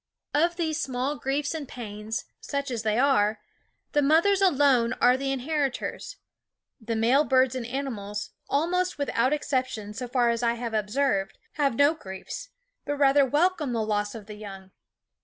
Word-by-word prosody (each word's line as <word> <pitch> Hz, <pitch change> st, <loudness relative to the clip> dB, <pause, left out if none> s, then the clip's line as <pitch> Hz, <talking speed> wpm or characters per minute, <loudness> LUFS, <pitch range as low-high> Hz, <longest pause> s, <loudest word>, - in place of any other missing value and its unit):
Of 335 Hz, +4 st, +2 dB
these 320 Hz, -3 st, -1 dB
small 260 Hz, +2 st, -2 dB
griefs 285 Hz, +2 st, -1 dB
and 310 Hz, -4 st, -5 dB
pains, 215 Hz, -2 st, -5 dB
such 280 Hz, -1 st, -3 dB
as 235 Hz, -3 st, -2 dB
they 215 Hz, 0 st, 0 dB
are, 220 Hz, -6 st, +3 dB, 0.5 s
the 295 Hz, -, +3 dB
mothers 335 Hz, +7 st, +4 dB
alone 275 Hz, -9 st, +4 dB
are 250 Hz, 0 st, +4 dB
the 270 Hz, +1 st, -2 dB
inheritors. 275 Hz, 0 st, -2 dB, 0.6 s
The 230 Hz, -1 st, -3 dB
male 240 Hz, +6 st, +4 dB
birds 260 Hz, -3 st, +3 dB
and 250 Hz, -3 st, -4 dB
animals, 225 Hz, -6 st, -4 dB, 0.2 s
almost 360 Hz, +5 st, 0 dB
without 260 Hz, -3 st, +1 dB
exception 255 Hz, -8 st, -2 dB
so 245 Hz, +3 st, -5 dB
far 240 Hz, -1 st, +2 dB
as 230 Hz, 0 st, -2 dB
I 235 Hz, -1 st, +1 dB
have 235 Hz, -1 st, -5 dB
observed, 215 Hz, -1 st, 0 dB
have 280 Hz, -5 st, 0 dB
no 285 Hz, +4 st, +5 dB
griefs, 195 Hz, -, -8 dB, 0.3 s
but 290 Hz, -, -2 dB
rather 280 Hz, 0 st, +5 dB
welcome 300 Hz, -1 st, +1 dB
the 225 Hz, -2 st, 0 dB
loss 210 Hz, 0 st, -1 dB
of 215 Hz, -3 st, -8 dB
the 210 Hz, -, -9 dB
young. 195 Hz, -2 st, -10 dB
260 Hz, 160 wpm, -26 LUFS, 225-290 Hz, 0.6 s, no